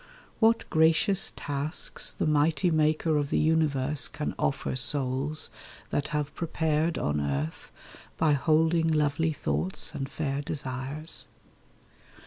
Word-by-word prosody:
What 225 0 +3
gracious 165 +5 +3
tasks 145 +3 +1
The - - -3
Mighty 155 +4 +2
Maker 155 0 +2
of 145 -1 -1
the - - 0
universe 150 -3 +2
Can 150 0 -4
offer 135 - -1
souls 135 +3 +1 0.4
that 145 +1 -1
have 150 -1 -3
prepared 160 -1 -1
on 75 0 -1
earth 70 +2 -3 0.5
By 155 -2 +3
holding 160 +3 +2
lovely 155 0 +1
thoughts 80 - -3
and 135 -1 -4
fair 140 -1 -3
desires! 145 0 -3
150 Hz, 115 wpm, -27 LUFS, 135-160 Hz, 0.5 s, What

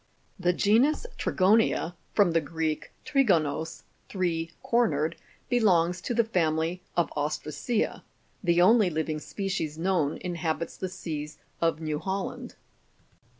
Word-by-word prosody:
The 180 -1 +3
genus 230 - +3
Trigonia,(Jig.65 190 -3 +2 0.2
from 200 -5 +5
the 165 0 +2
Greek, 155 0 -3
trigonos, 165 - +1 0.3
three 170 -4 -1
cornered), 165 -9 +1 0.3
belongs 180 -7 +3
to 240 - -2
the 235 - +4
family 165 -4 0 0.2
of 175 - +2
ostracea; 155 - -2 0.4
the 175 -1 +4
only 215 0 +5
living 155 -1 -2
species 185 -4 -3
known 165 -4 +1
inhabits 170 -2 -2
the 185 - -4
seas 155 -5 -6 0.2
of 165 -2 +2
New 155 -2 -2
Holland. 190 +2 -4
175 Hz, 115 wpm, -28 LUFS, 160-195 Hz, 0.4 s, from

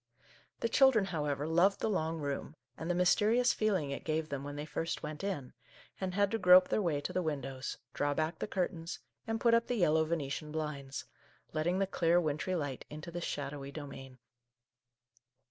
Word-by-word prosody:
The - - +2
children, 245 -4 +5
however, 150 -5 -2
loved 175 +5 +4
the - - 0
long 165 -6 0
room, 145 0 -4 0.2
and 165 - -5
the 175 - +2
mys 180 0 +5
terious 235 +4 +3
feeling 190 -10 0
it 140 - -4
gave 155 0 -1
them 140 -1 -3
when 145 0 -6
they 145 +1 -4
first 165 +2 -3
went 150 +3 -5
in, 175 -11 -3 0.5
and 185 -1 -2
had 200 0 +3
to 225 - 0
grope 180 -1 +7
their - - +2
way 165 -6 +1
to - - -4
the 185 - +1
windows, 135 -4 -3 0.2
draw 145 0 0
back 160 +2 -1
the - - -2
curtains, 180 -4 -2 0.3
and 225 0 -1
put 235 0 +4
up 230 0 +4
the 245 - 0
yellow 160 -6 +4
Venetian 155 -2 -3
blinds, 150 -3 -4 0.5
letting 165 +4 +1
the 195 - +2
clear, 175 -2 +3
wintry 155 +3 -1
light 145 -6 -3
into 155 +3 -7
this 175 0 -4
shadowy 140 -1 -4
domain. 135 -3 -8
160 Hz, 190 wpm, -33 LUFS, 145-185 Hz, 0.5 s, grope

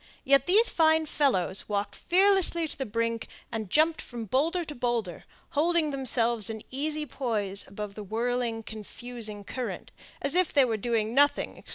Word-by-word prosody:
Yet 275 -1 +3
these 425 +6 +5
fine 320 -1 +3
fellows 220 - 0
walked 205 0 -2
fearlessly 370 -3 +4
to - - -5
the 265 -2 -4
brink, 230 +1 -2 0.2
and 220 -4 -4
jumped 315 - +3
from 235 -2 -7
boulder 325 - 0
to 300 - -7
boulder, 235 - -2 0.3
holding 325 0 +2
themselves 235 -5 0
in 220 -1 -6
easy 300 +3 -2
poise 210 -9 -3
above 205 +1 -7
the 210 - -8
whirling, 230 +2 -2
confusing 220 0 -6
current, 250 +4 -6 0.3
as 280 - 0
if 365 -1 +2
they 280 -3 +5
were 230 -3 -1
doing 225 0 -1
nothing 285 +2 +2
extraordinary. - - -18
245 Hz, 165 wpm, -27 LUFS, 220-305 Hz, 0.3 s, these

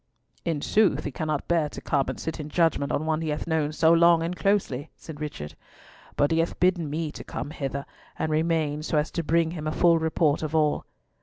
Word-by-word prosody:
"In 160 -4 -1
sooth 195 -9 +3
he 145 - -3
cannot 155 +1 -3
bear 165 -3 +2
to - - -8
come 140 -2 0
and - - -5
sit 160 +1 -4
in 150 0 -5
judgment 160 -4 +1
on 155 - -1
one 160 0 0
he 160 - -2
hath 150 0 -2
known 160 -2 0
so 160 +1 +4
long 170 0 +5
and 170 +2 -2
closely," 165 -7 0
said 155 -2 -10
Richard; 75 - -5 0.6
"but 145 - +2
he 165 - +2
hath 165 - -1
bidden 180 -4 +2
me 155 +1 -2
to - - -9
come 145 - -6
hither 140 -1 -4 0.3
and 155 - -1
remain 155 -2 0
so 155 0 -1
as 150 +1 0
to 170 - -2
bring 165 +1 +2
him 155 -3 -5
a - - 0
full 170 0 +4
report 160 -2 +1
of 155 0 -3
all." 150 -2 +2
155 Hz, 225 wpm, -26 LUFS, 150-165 Hz, 0.6 s, long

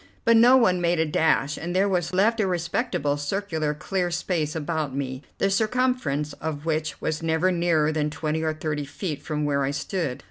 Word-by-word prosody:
But 230 - +6
no 245 +3 +7
one 185 -8 +3
made 170 -1 +1
a 160 - +3
dash; 150 -2 +1
there 185 +4 +1
was 175 -3 0
left 215 +5 +2
a 205 - +2
respectable 170 - -1
circular 155 -1 -2
clear 180 +3 -2
space 165 -2 -1
about 155 -3 -2
me, 130 -1 -3 0.2
the 195 - +1
circumference 215 - 0
of 155 -1 -4
which 155 -1 -1
was 155 0 -2
never 165 +3 +1
nearer 170 -3 +2
than 150 -1 0
twenty 155 +1 -2
or 155 -1 -1
thirty 150 -2 -3
feet 150 0 -5
from 150 -1 -2
where 140 -1 +1
I 135 - 0
stood. 145 -1 -3
160 Hz, 185 wpm, -25 LUFS, 150-185 Hz, 0.2 s, no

